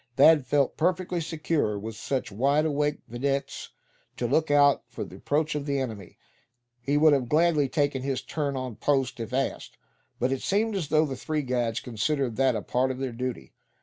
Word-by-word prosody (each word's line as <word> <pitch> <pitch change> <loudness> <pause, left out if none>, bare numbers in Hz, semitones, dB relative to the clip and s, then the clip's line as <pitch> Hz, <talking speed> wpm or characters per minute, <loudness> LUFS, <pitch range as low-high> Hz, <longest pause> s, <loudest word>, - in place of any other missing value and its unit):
Thad 145 0 +6
felt 140 0 +1
perfectly 180 +1 0
secure 155 -8 -1
with 110 +2 -6
such 125 +1 -3
wide 140 +9 +2
awake 150 -1 0
videttes 135 +4 -3 0.5
to 120 - -2
look 150 +6 +1
out 145 -1 +5
for - - -6
the - - -10
approach 150 +1 0
of 150 -1 -4
the 140 -1 0
enemy. 110 -8 -6 0.6
He 140 +4 +1
would 155 0 +6
have 130 -4 0
gladly 155 -3 +3
taken 145 -1 0
his 135 -1 -2
turn 145 -3 -2
on 130 -4 -5
post 135 -3 0
if 115 +1 -5
asked; 135 +1 -2 0.4
but 125 +2 +1
it 135 - -1
seemed 210 +2 0
as 175 -6 -2
though 155 +2 +3
the 135 -3 -4
three 150 +3 -2
guides 120 -3 -1
considered 125 +1 -1
that 135 -2 +3
a 105 - -3
part 130 +1 0
of 130 - -3
their 130 -1 -3
duty. 125 +1 -5
140 Hz, 190 wpm, -27 LUFS, 125-150 Hz, 0.6 s, Thad